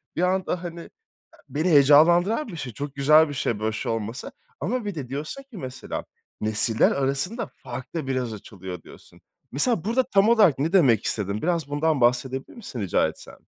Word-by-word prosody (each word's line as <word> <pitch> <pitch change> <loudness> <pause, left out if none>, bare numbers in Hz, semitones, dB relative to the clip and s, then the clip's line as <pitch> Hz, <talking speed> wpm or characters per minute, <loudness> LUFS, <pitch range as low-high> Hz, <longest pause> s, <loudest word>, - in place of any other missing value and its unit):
Bir 170 - -1
anda, 185 -1 0
hani, 170 -1 -7 0.6
beni 155 +5 0
heyecanlandıran 170 - +5
bir 180 - -8
şey. 125 -6 -6
Çok 145 +2 -6
güzel 150 +3 +5
bir - - -5
şey 115 -5 -1
böyle 110 0 -1
bir - - -6
şey - - -3
olması 115 +2 -4 0.3
ama 220 - -2
bir 200 -4 -4
de 135 -5 -5
diyorsun 155 - -5
ki 260 -7 -13
mesela, 130 -4 -6 0.4
"Nesiller 110 +1 +2
arasında 140 - -1
fark 125 +2 -9
da 155 -5 -3
biraz 125 -4 -2
açılıyor." 95 -4 -9
Diyorsun. - - -16 0.3
Mesela 180 - +1
burada 235 +5 +1
tam 205 -3 +3
olarak 205 - +5
ne 160 +6 -1
demek 130 - +4
istedin 100 0 -2
biraz 170 -3 0
bundan 145 -1 0
bahsedebilir 125 +2 0
misin 165 - -7
rica 95 - +2
etsem? - - -12
145 Hz, 180 wpm, -24 LUFS, 125-180 Hz, 0.6 s, heyecanlandıran